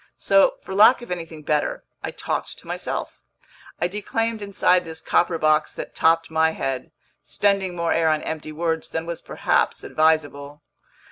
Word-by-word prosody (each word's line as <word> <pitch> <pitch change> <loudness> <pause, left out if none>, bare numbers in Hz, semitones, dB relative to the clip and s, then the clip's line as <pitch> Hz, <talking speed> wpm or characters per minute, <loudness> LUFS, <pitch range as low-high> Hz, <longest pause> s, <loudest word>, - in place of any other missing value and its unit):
So, 195 0 +4
for 190 - -7
lack 220 +5 +6
of 240 - -10
anything 165 -3 -6
better, 150 0 -1 0.2
I - - -4
talked - - -4
to - - -16
myself: - - -5 0.6
I 175 - +1
declaimed 220 +3 -2
inside 190 -2 +2
this 160 -1 -8
copper 175 -1 +1
box 155 -1 +2
that - - -7
topped 165 0 +2
my 160 0 +2
head, 135 -4 -3 0.3
spending 195 -3 0
more 170 -1 0
air 165 -1 +2
on 155 -1 0
empty 155 -1 -5
words 160 +1 -2
than 160 0 -3
was 170 0 -5
perhaps - - 0
advisable. 150 -2 0
165 Hz, 160 wpm, -23 LUFS, 155-190 Hz, 0.6 s, lack